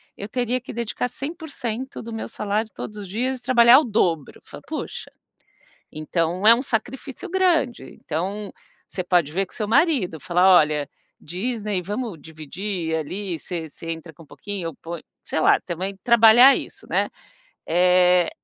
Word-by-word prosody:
eu 200 - -7
teria 250 +1 -1
que 245 - -9
dedicar 235 +1 -3
100% 275 -4 -6
do 230 0 -8
meu 225 - -5
salário 215 0 -2
todos 210 - -7
os 205 -2 -7
dias 250 +6 -2
e - - -18
trabalhar 245 0 +7
o - - 0
dobro". 175 - 0
Eu - - -38
falo: - - -12
"Poxa!" - - -6 0.8
Então 165 +4 -1
é 230 - +9
um 250 - -3
sacrifício 255 +2 -4
grande. 340 -9 +1 0.2
Então 190 +6 -3 0.4
você 185 - -4
pode 175 -4 +2
ver 195 +4 0
com - - -18
seu 210 - -3
marido, 225 - +2
falar: 180 +4 +2
"Olha, 150 -2 +1 0.3
Disney, 205 +2 -3
vamos 210 0 -4
dividir 160 +3 -5
ali, 180 +3 -4
você 165 -2 -6
você 165 +3 -10
entra 165 0 -7
com 165 +2 -16
pouquinho, 200 +3 -7
eu 160 - -12
ponho" 170 0 -8 0.2
sei - - -2
lá, - - +4
também 185 +3 -4
trabalhar 235 +3 +7
isso, - - -7
né, - - +1 0.6
eh, 180 +1 +4
205 Hz, 165 wpm, -23 LUFS, 170-240 Hz, 0.8 s, é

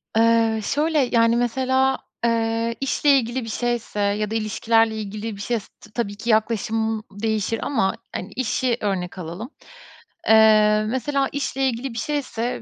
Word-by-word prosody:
Eee, 225 0 +3
şöyle, 305 +6 +1
yani, 230 -3 +3
mesela, 260 +2 +1 0.3
eee, 230 0 0
işle 275 +2 +1
ilgili 245 0 -2
bir 225 - -6
şeyse 240 -2 -2
ya 205 +1 0
da 225 - -2
ilişkilerle 225 +1 +2
ilgili 215 +1 -5
bir 200 - -9
şeyse 230 -1 -2
t 215 - -16
tabii 205 -3 -3
ki 230 +3 -5
yaklaşımım 220 0 +1 0.2
değişir 220 0 0
ama 195 -9 0 0.2
hani, 185 +3 -5
işi 250 0 0
örnek 190 -3 -2
alalım. 180 - -6 0.8
Eee, 215 -1 +6
mesela 270 +3 0
işle 270 -1 -1
ilgili 245 +1 -4
bir 230 - -8
şeyse, 250 -4 -3
225 Hz, 150 wpm, -22 LUFS, 215-245 Hz, 0.8 s, Eee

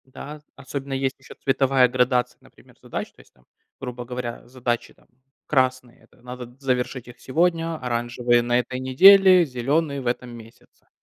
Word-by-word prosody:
Да, 145 +3 -10
особенно 140 0 -6
есть 135 0 -2
ещё 130 - -14
цветовая 135 -1 +2
градация, 125 0 0
например, - - -21
задач. - - -6
То - - -27
есть - - -26
там, 60 - -29 0.3
грубо 125 -2 -6
говоря, 120 -1 -6
задачи 120 -1 -3
там - - -28 0.4
красные- 130 -3 0
это - - -25
надо 125 0 -9
завершить 130 -2 -2
их 120 - -13
сегодня, 165 +3 0
оранжевые- 120 -1 0
на 120 0 +1
этой 125 +1 -4
неделе, 185 +7 +7
зеленые- 140 +3 -1
в 125 - -6
этом 125 +1 -2
месяце. 115 -1 -15
130 Hz, 160 wpm, -23 LUFS, 120-135 Hz, 0.4 s, неделе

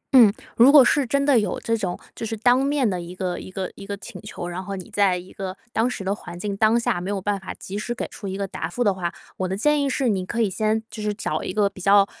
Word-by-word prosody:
嗯， 230 -6 +9 0.2
如 250 +4 +8
果 280 -4 +9
是 280 -2 +3
真 280 +3 +1
的 275 -5 +5
有 210 - -2
这 230 - 0
种， 190 -5 -3 0.2
就 - - -7
是 225 0 -3
当 245 +4 +4
面 280 -3 +2
的 185 -3 -1
一 175 +1 -8
个 185 -1 -2
一 - - -9
个 185 0 -4
一 - - -11
个 200 0 -5
请 - - -10
求， 175 -4 -6
然 175 +2 -5
后 195 +1 -5
你 185 -2 -8
在 195 -3 +3
一 180 +1 -10
个 190 -1 -5
当 225 +3 +1
时 225 - -5
的 190 +1 0
环 175 -4 -9
境 200 +1 -3
当 220 +3 +4
下 175 -6 0
没 185 - -4
有 200 -1 -1
办 200 +1 -1
法 190 - -7
及 200 +2 -6
时 240 +3 -3
给 - - -3
出 200 - -8
一 190 0 -3
个 200 -1 -2
答 - - -4
复 245 - -1
的 205 - +3
话。 175 -2 -3 0.3
我 185 - -1
的 190 +1 -2
建 295 +5 +3
议 280 - +1
是 265 -2 +1
你 190 -3 0
可 235 +5 -4
以 215 -4 +2
先 220 +3 0
就 215 - -7
是 210 0 0
找 200 - -2
一 - - -3
个 205 +1 +2
比 195 -2 -8
较 200 +1 +6
205 Hz, 320 characters per minute, -23 LUFS, 190-230 Hz, 0.3 s, 嗯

